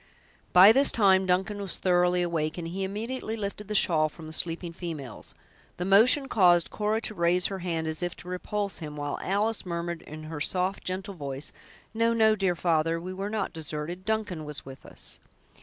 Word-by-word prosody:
By 185 +4 +9
this 275 +4 +5
time 190 -3 +4
Duncan 190 +3 0
was 195 - -1
thoroughly 180 -1 +2
awake, 160 -2 -2
and 170 -1 -4
he 190 +3 -4
immediately 220 +4 -4
lifted 205 0 -5
the 210 - -3
shawl 155 -5 +3
from 160 +1 -12
the 155 - -8
sleeping 170 +1 -1
females. 155 - -7 0.4
The 180 - -3
motion 235 +8 +6
caused 175 -8 +4
Cora 215 +1 0
to 215 - -5
raise 175 -1 +2
her 195 -1 -2
hand 170 -3 -2
as 160 +1 -1
if 175 0 -3
to 175 - -14
repulse 200 +2 -3
him, 150 -3 -7
while 145 -1 -4
Alice 210 +3 0
murmured, 170 -1 -4
in 155 +1 -10
her 155 -1 -6
soft, 185 +4 -1
gentle 190 +2 -4
voice, 140 -4 -4 0.4
"No, 230 +1 +2
no, 220 -1 +4
dear 190 -3 0
father, 165 -1 +1
we 185 +2 -6
were 195 +2 -4
not 215 -2 -2
deserted; 160 +3 -5
Duncan 210 -6 -2
was 150 -1 -7
with 135 0 -11
us!" - - -9
180 Hz, 190 wpm, -27 LUFS, 165-200 Hz, 0.4 s, By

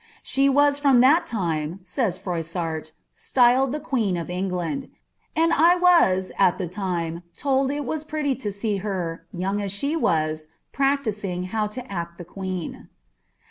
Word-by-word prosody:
''She 275 +1 +2
was 285 +1 +4
from 275 -4 +5
that 290 +7 +5
time," 170 -4 -2
says 185 0 -1
Froissart," 165 -2 -4 0.2
styled 255 +1 +3
the 300 - -2
(|iie«n 230 - 0
of 165 - -6
EagiiiMl. 180 +8 -3 0.5
And 330 +1 +3
I 335 +4 +5
was 335 - +4
at 190 -3 +4
the 185 - -3
lime 170 -4 -2 0.2
told 270 -1 +1
it 290 0 -2
was 310 +4 -3
preity 305 -2 -1
to 210 -5 -3
see 200 +1 -2
her, 175 -5 -4
young 195 +3 -2
as 200 -1 -2
she 280 +10 -1
wk, 155 - +1 0.3
practising 215 -10 -1
how 215 -1 +1
to 245 +4 -7
act 170 -2 -4
the 175 - -8
queen." 185 -1 -6
200 Hz, 155 wpm, -24 LUFS, 175-275 Hz, 0.5 s, from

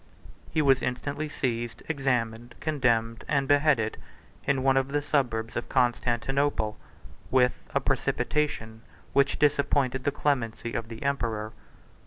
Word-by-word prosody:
He 155 - +1
was 135 -2 +4
instantly 145 +4 -3
seized, 120 -4 -3
examined, 120 -6 -1
condemned, 120 -7 +1
and 140 -2 +1
beheaded, 140 -6 +3 0.5
in 135 -2 +1
one 135 0 +4
of 135 0 +2
the 145 +1 0
suburbs 120 -6 0
of 120 - -3
Constantinople, 125 -1 +1 0.5
with 125 -1 +3 0.2
a - - +5
precipitation 115 -8 -1 0.3
which 140 +1 +3
disappointed 140 -3 +2
the 145 - +1
clemency 120 -5 -1
of 115 -1 -3
the 115 -1 -7
emperor. 115 -6 -1
130 Hz, 125 wpm, -27 LUFS, 115-140 Hz, 0.5 s, a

